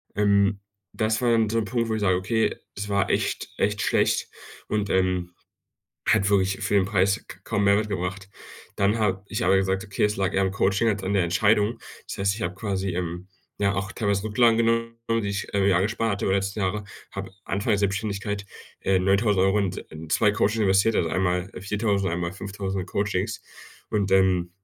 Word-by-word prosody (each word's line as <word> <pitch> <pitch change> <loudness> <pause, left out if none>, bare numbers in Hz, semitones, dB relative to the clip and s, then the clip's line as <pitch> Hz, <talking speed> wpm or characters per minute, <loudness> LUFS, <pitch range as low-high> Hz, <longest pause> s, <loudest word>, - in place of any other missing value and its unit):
Ähm, 100 0 +3 0.3
das 110 +1 0
war 120 -1 +3
dann 115 -2 +3
so 115 - 0
'n 110 - -2
Punkt, 115 +1 -1
wo 110 - 0
ich 110 - -3
sage, 95 -3 +3
okay, 110 +4 0 0.2
es 105 +1 -5
war 100 -1 +1
echt, - - -1
echt 105 -1 0
schlecht - - +1 0.4
und, 105 -1 -1
ähm, 90 -2 0 0.7
hat 100 - +3
wirklich 95 -1 +2
für - - -1
den 100 - +4
Preis 95 -1 +1
k 85 - -10
kaum 105 -2 0
Mehrwert 100 +2 +3
gebracht. 95 0 -4 0.5
Dann 100 +2 +2
habe 95 -3 0
ich 110 +3 -2
aber 95 +1 +4
gesagt: 95 +1 0
„Okay, 100 -1 -1
es 105 0 +1
lag 95 -2 -1
eher 95 - +3
am 95 - +1
Coaching 100 +3 +1
als 105 -2 -1
an 95 +2 -1
der 100 - +3
Entscheidung. 105 +5 +2 0.3
Das - - -6
heißt, 100 0 +1
ich 110 - -6
habe 85 +1 -2
quasi, 95 -1 -2
ähm, 90 +1 -4 0.3
ja, 100 -1 +2
auch 95 0 -2
teilweise 100 -2 -1
Rücklagen 115 +1 +3
genommen, 115 0 +1 0.3
die 100 - -2
ich, 100 -1 -3
ähm, 100 -1 +2
ja, 95 -3 +4
gespart 110 +3 0
hatte 100 - -2
über 95 - +2
den - - +3
letzten 100 +2 -4
Jahre, 100 +2 -1 0.3
habe 100 0 -6 0.2
Anfang 100 +4 -1
der 105 - +3
Selbständigkeit, 100 0 -2 0.4
äh, 95 -1 +3
9.000€ 95 +1 +3
in 100 -3 +1
s - - -7
äh, 80 +1 -9
2 105 +7 +3
Coaching 105 +2 +1
investiert, 100 +3 +3
also 85 - +1
einmal 90 +1 0
4.000, 100 0 0
einmal 85 0 -2
5.000er 95 -1 -4
Coachings 100 +2 -2 0.5
und, 100 -2 0
ähm, 95 -2 +3
100 Hz, 200 wpm, -25 LUFS, 95-105 Hz, 0.7 s, den